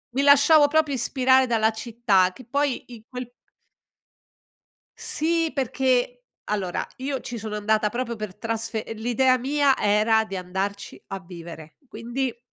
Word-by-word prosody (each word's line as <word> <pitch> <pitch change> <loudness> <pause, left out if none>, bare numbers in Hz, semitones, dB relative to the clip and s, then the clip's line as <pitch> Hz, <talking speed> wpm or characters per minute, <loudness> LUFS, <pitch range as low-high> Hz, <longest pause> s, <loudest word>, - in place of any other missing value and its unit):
mi 275 - +2
lasciavo 290 +1 +6
proprio 305 -1 +1
ispirare 260 +1 +3
dalla 225 -2 +2
città 220 -5 +1
che 255 - -13
poi 285 +1 -1
in 235 -3 -12
quel 250 -1 -7 1.7
Sì, 330 +1 0
perché 250 -2 0 0.2
allora 195 -4 -2
io 270 +1 -3
ci 240 -1 -6
sono 215 0 -5
andata 215 0 +1
proprio 235 +1 -4
per 215 -4 -6
trasfe 225 -1 -3
l'idea 250 +3 +2
mia 280 +1 +2
era 215 +2 +3
di 195 -3 -6
andarci 190 +2 -4
a 195 -1 -5
vivere, 170 -3 -11
quindi 240 +2 -4
235 Hz, 135 wpm, -24 LUFS, 210-265 Hz, 1.7 s, lasciavo